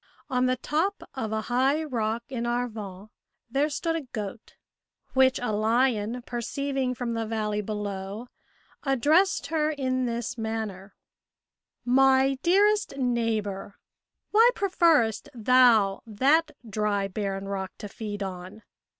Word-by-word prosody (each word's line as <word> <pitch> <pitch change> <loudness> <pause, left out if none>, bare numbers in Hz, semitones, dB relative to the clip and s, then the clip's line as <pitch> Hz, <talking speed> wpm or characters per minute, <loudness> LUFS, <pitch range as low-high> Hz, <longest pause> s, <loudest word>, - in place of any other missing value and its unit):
On 250 0 +2
the 255 - +2
top 320 +10 -1
of 225 -5 -4
a 220 0 -1
high 265 +7 +1
rock 230 -5 -2
in 240 -3 -3
Arvon 215 -5 -4 0.4
there 280 +4 +2
stood 330 +2 -1
a 330 - -1
goat, 225 -4 -7 0.6
which 260 -1 +4
a 245 -3 -2
lion 225 +1 +1
perceiving 255 +2 -2
from 235 -1 -3
the 225 -1 -2
valley 210 -1 -1
below, 205 +1 -5 0.6
addressed 295 +6 +2
her 305 -1 +2
in 255 -4 -1
this 235 +1 -3
manner: 215 -3 -4 0.9
"My 265 +1 +4
dearest 405 -1 +3
neighbour, 225 -6 -1 0.6
why 450 +3 +7
preferrest 330 - +2
thou 230 -4 +4
that 280 +9 +3 0.2
dry 210 -2 0
barren 195 0 -3
rock 190 -1 -3
to 210 - -7
feed 205 0 -5
on? 185 +3 -7
235 Hz, 125 wpm, -27 LUFS, 210-270 Hz, 0.9 s, why